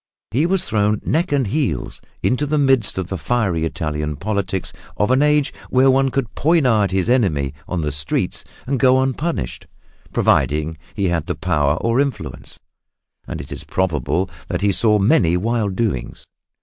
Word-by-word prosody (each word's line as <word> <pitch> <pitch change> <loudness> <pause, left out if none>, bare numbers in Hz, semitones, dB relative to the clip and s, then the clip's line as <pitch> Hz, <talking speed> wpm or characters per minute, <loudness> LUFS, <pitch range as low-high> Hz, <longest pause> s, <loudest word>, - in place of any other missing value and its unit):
He 145 +9 +2
was 190 0 +1
thrown 105 0 +1
neck 165 +2 0
and 140 -3 +2
heels 115 - -2 0.2
into 135 +4 +1
the 150 +1 +1
midst 135 -9 +2
of 95 - -1
the 95 0 -5
fiery 100 -10 0
Italian 75 -2 -3
politics 95 +1 -3 0.2
of 105 +4 +1
an 130 +2 +4
age 150 -1 +3 0.2
when 130 +1 +5
one 135 +1 +3
could 125 -5 -2
poniard 130 - +3
his 95 +1 0
enemy 90 - +1
on 90 -2 -2
the 75 -1 -1
streets 75 +1 -2 0.2
and 135 0 -1
go 130 +1 +5
unpunished, 135 - -2 0.4
providing 75 +4 +1 0.2
he 100 -3 0
had 85 -3 -1
power 75 0 +2
or 115 +2 +1
influence. 140 -1 -3 0.7
And - - -5
it - - -9
is - - -6
probable 85 -1 -1 0.2
that - - -2
he 100 0 +3
saw 105 +2 +3
many 95 - +3
wild 105 -1 -1
doings. 95 - -2
105 Hz, 160 wpm, -20 LUFS, 85-130 Hz, 0.7 s, when